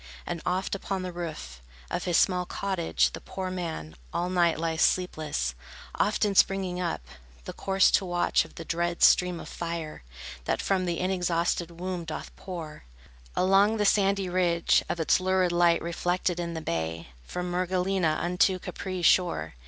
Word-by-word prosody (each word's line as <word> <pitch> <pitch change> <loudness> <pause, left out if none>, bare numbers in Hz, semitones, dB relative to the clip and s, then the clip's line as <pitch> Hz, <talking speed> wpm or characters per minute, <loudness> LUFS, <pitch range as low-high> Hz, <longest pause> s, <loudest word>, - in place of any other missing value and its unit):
And 170 -2 -4
oft 185 +2 -1
upon 195 -1 -3
the 180 - -4
roof 155 - -6 0.3
Of - - -2
his 175 -2 +2
small 180 -2 +3
cottage, 80 - 0
the - - -8
poor 185 -1 -5
man 165 - -5 0.2
All 175 +1 -1
night 175 -2 +3
lies 160 0 -1
sleepless, 155 - +1 0.4
often 205 0 +1
springing 190 -2 +2
up, 175 -2 -2 0.4
The - - -6
course 195 -1 +3
to 195 - +3
watch 175 -1 +2
of - - -15
the 165 - -8
dread 170 +1 -1
stream 180 -2 +5
of - - -9
fire 165 -2 -5 0.4
That - - 0
from 190 -2 0
the 170 -1 -1
inexhausted 175 -2 -1
womb 180 -1 -3
doth 160 - -7
pour 165 - -8 0.5
Along 195 +4 +4
the 210 - +1
sandy 195 -1 +3
ridge, 175 -2 +2
Its 165 0 +2
lurid 185 -1 +2
light 175 -1 +3
reflected 175 +1 -1
in 170 -1 -3
the 160 - -4
bay, 80 - -3
From 180 - -4
Mergellina 180 -2 +1
unto 180 +2 +2
Capri's 185 -1 -4
shore. 180 -2 +3
175 Hz, 160 wpm, -27 LUFS, 165-185 Hz, 0.5 s, stream